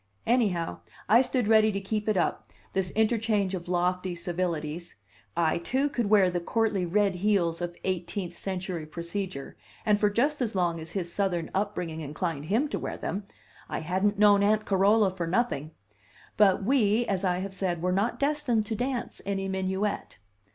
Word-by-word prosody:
Anyhow, 205 -9 +1 0.3
I 230 +5 +6
stood 250 -3 0
ready 220 0 +5
to 200 - -1
keep 210 +2 -2
it 210 - +2
up, 175 - 0 0.3
this 190 -1 0
interchange 220 -3 +1
of 175 -2 -5
lofty 180 0 0
civilities. 170 -2 -3 0.4
I, 165 -1 +2
too, 265 +11 0
could 240 -6 -1
wear 200 -4 +5
the 175 - -1
courtly 200 0 0
red 200 +2 +2
heels 180 -4 +1
of 175 0 -3
eighteenth 185 0 -3
century 185 -4 -4
procedure, 170 -2 -5 0.3
and 210 -2 +3
for 210 - +3
just 275 +8 +1
as 230 -4 -1
long 175 -2 +1
as 160 +1 -8
his 175 -3 -2
Southern 175 -5 -1
up 205 +2 -1
bringing 165 -3 -4
inclined 155 0 -3
him 225 - +1
to - - -2
wear - - -4
them; 195 +3 -4 0.4
I - - -3
hadn't 190 +5 0
known 205 -1 +6
Aunt 215 +1 +2
Carola 200 +1 +4
for 180 -3 -4
nothing! 170 - 0 0.7
But 200 -2 +4
we, 235 -1 +3
as 195 -3 -1
I 180 -2 +1
have 190 +1 -4
said, 175 -3 -2
were 180 - +2
not 200 +6 0
destined 280 -6 +1
to 220 0 -3
dance 250 +1 -3
any 195 -1 -2
minuet. 190 +2 -2
195 Hz, 175 wpm, -28 LUFS, 175-215 Hz, 0.7 s, I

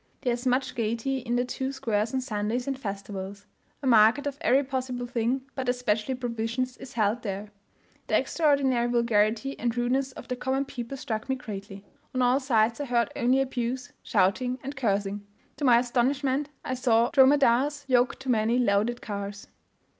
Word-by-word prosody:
There 245 -3 +1
is 245 +2 -3
much 255 +2 +1
gaiety 235 +3 -1
in 240 -1 -2
the 245 +1 +1
two 265 +1 -3
squares 220 -4 -1
on 265 - -1
Sundays 225 0 -2
and 275 - -1
festivals. 200 -3 -6 0.4
A - - -3
market 230 +3 +5
of 285 0 -4
every 280 -3 +4
possible 255 -2 -3
thing, 240 +2 -1
but 260 -2 -3
especially 245 0 0
provisions, 245 +1 -2
is 255 - -10
held 220 +1 +1
there. 200 -1 -5 0.6
The - - +3
extraordinary 275 -6 +2
vulgarity 235 +2 +1
and 235 0 -1
rudeness 260 +3 0
of - - -10
the 250 - -2
common 265 +2 -1
people 265 0 -6
struck 220 -1 -4
me 265 - +2
greatly; 200 -4 -8 0.3
on 255 - +2
all 250 +2 +4
sides 230 -3 +2
I 290 - -2
heard 240 -3 +1
only 255 +3 +3
abuse, 260 +1 -3
shouting, 245 +7 +1
and 275 +2 -5
cursing. 205 -5 -1 0.3
To 290 - -2
my 240 -2 +7
astonishment 265 +3 +1 0.2
I 255 - -2
saw 240 -2 +2
dromedaries 280 +1 +4
yoked 250 0 +2
to 265 - -6
many 230 0 +2
loaded 235 0 +1
carts. 200 -1 -5
245 Hz, 170 wpm, -27 LUFS, 220-265 Hz, 0.6 s, my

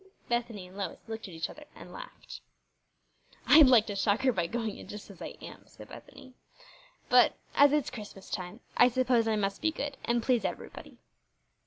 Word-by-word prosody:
Bethany 235 -5 -2
and 185 - -16
Lois 200 -1 -4
looked 220 -1 -6
at 185 - -11
each 165 +1 -2
other 300 - -12
and - - -12
laughed. - - -10 1.0
"I'd 300 -2 +8
like 240 -4 +6
to 205 - -5
shock 200 +2 +1
her 265 -1 +3
by 175 -5 -1
going 225 0 -4
in - - -11
just 210 0 -9
as 190 - -16
I - - -7
am," - - -11
said - - -14
Bethany; 260 -2 -13 0.7
"but - - +5 0.2
as 285 0 +6
it's 295 -2 0
Christmas 205 -3 -10
time 185 +5 -5
I 245 - +7
suppose 245 -2 +2
I 220 - +2
must 200 -1 -2
be 320 - +2
good 290 -3 -5
and 235 -1 0
please 245 -2 +2
everybody." - - -6
230 Hz, 190 wpm, -30 LUFS, 200-260 Hz, 1.0 s, I'd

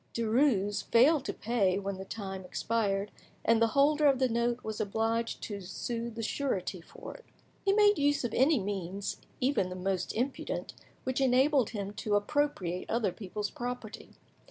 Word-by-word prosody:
Derues 220 -3 +2
failed 275 +5 +4
to - - -1
pay 205 -5 +1
when 200 -1 -3
the 190 - -6
time 195 -3 -6
expired, 200 +1 -1 0.3
and 230 0 +4
the 230 - +6
holder 295 +2 +5
of 275 -2 +4
the 260 0 +3
note 235 +1 0
was 220 -1 -3
obliged 225 +2 -1
to 205 -2 -5
sue 230 +5 -4
the 230 0 -6
surety 200 -9 -2
for - - -10
it. - - -15 0.4
He 390 - +3
made 415 -1 +5
use 290 -1 +2
of 240 - -2
any 275 +2 +4
means, 195 -1 -3 0.2
even 255 -8 +1
the 180 - -6
most 185 0 -1
impudent, 255 +5 -2 0.3
which 260 +1 -1
enabled 265 0 +4
him 200 -2 -5
to 210 0 -1
appropriate 205 - 0
other 225 -4 +1
people's 205 +2 -5
property. 245 -3 -6
225 Hz, 165 wpm, -30 LUFS, 200-260 Hz, 0.4 s, the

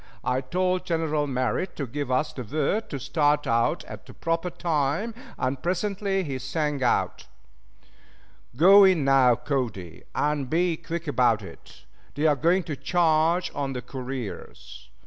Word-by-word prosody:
I 125 +1 0
told 180 +6 0
General 160 -4 -1
Merritt 130 +7 -1
to 140 - -3
give 140 +2 -4
us 140 +4 0
the 130 - -6
word 155 - -1
to 140 - -4
start 145 +2 +1
out 115 0 +1
at - - -10
the - - -13
proper 165 +2 -1
time, 170 +5 -1 0.2
and 130 +1 -2
presently 195 +2 -1
he 135 -5 -4
sang 145 +2 -2
out: 125 - 0 1.3
"Go 195 +8 +8
in 185 -7 +4
now, 135 -3 +5
Cody, 115 - -4
and 145 -3 0
be 170 +2 +1
quick 170 0 -6
about 120 -6 +2
it. 95 - -13 0.3
They 145 +2 -1
are 150 -2 +5
going 170 +7 +2
to 150 - -4
charge 165 +2 +2
on 140 -1 -3
the 125 -1 -5
couriers." 125 - -7
150 Hz, 150 wpm, -25 LUFS, 130-170 Hz, 1.3 s, Go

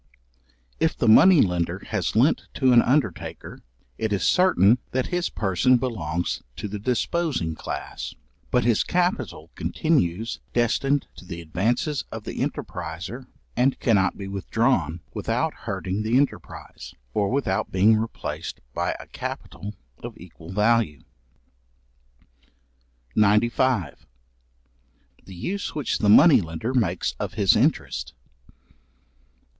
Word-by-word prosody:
If - - +1
the - - 0
money 170 +9 +7
lender 90 -3 -1
has - - -1
lent - - +3
to 130 -1 +3
an 120 - +8
undertaker, 125 - -1 0.4
it 110 -1 -1
is 100 -4 0
certain 125 - +4
that 130 0 +1
his 175 0 0
person 110 +6 +2
belongs 90 -10 -2
to 105 - -5
the 105 +1 -5
disposing 125 - -1
class; - - -6 0.3
but 125 - +2
his 115 -2 +3
capital 130 - -1
continues 115 - 0
destined 135 +4 +1
to - - -12
the 85 -1 -7
advances 115 - -1
of - - -6
the - - -6
enterpriser, 100 +11 -5 0.3
and 130 +2 +2
cannot 100 -5 +2
be 100 - -6
withdrawn 95 - 0
without - - -1
hurting 95 +3 -4
the 110 +3 +2
enterprise, 140 +1 -3 0.2
or 100 -2 +1
without 130 -8 -1
being 100 +4 +5
replaced 110 +1 -4
by - - -1
a - - -9
capital 105 +1 -7 0.3
of - - -8
equal 85 -1 -13
value. 105 -6 +1 2.1
§95. 105 - +2 1.3
The 95 - -11
use 185 - -4
which 150 -5 -1
the 105 - +2
money 145 +5 +8
lender 80 +9 -4
makes 90 - 0
of - - -4
his - - +4
interest. - - 0
110 Hz, 120 wpm, -24 LUFS, 95-130 Hz, 2.1 s, an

